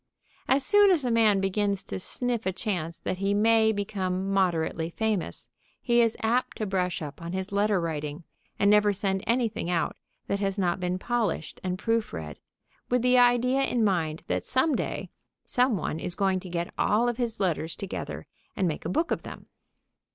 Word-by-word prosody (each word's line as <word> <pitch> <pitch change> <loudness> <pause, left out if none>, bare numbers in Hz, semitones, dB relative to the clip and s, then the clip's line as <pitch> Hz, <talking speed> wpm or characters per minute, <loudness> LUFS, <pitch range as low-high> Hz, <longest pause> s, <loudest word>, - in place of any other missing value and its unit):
As 270 +1 +3
soon 410 -1 +6
as 330 -8 +3
a 245 - +1
man 220 -3 +4
begins 200 0 0
to - - -5
sniff 240 +2 -2
a - - +2
chance 175 -4 -3
that 185 - -4
he 200 +1 +1
may 220 +1 +4
become 195 -2 -2
moderately 170 -3 +1
famous 215 0 -2 0.3
he 240 -1 +3
is 230 -1 +1
apt 235 +3 0
to 215 - -2
brush 185 -2 -1
up 150 +2 -8
on 170 +1 -5
his 190 +1 -3
letter 205 -1 +2
writing 155 -1 -4 0.3
and 200 0 +4
never 210 0 +5
send 190 -1 -1
anything 230 -7 0
out 175 -2 0 0.3
that 200 - -1
has 195 0 -1
not 180 -2 0
been 180 0 -1
polished 220 -6 -2
and 185 0 -2
proof 225 +2 -1
read, 75 -3 -6 0.5
with 245 -1 +1
the 250 0 +5
idea 245 +2 +4
in 245 -4 +1
mind 165 -6 0
that - - -1
some 265 +4 +2
day - - -3 0.3
some 250 -3 +2
one 160 -1 -3
is 175 - -1
going 190 -2 +1
to 185 - -10
get 170 0 -3
all 225 +4 +3
of 240 -1 -1
his 235 -3 -1
letters 165 -4 -1
together 195 - -5 0.3
and 185 - +1
make 160 - -4
a - - -1
book 325 - 0
of - - 0
them. - - -10
200 Hz, 190 wpm, -27 LUFS, 180-230 Hz, 0.5 s, soon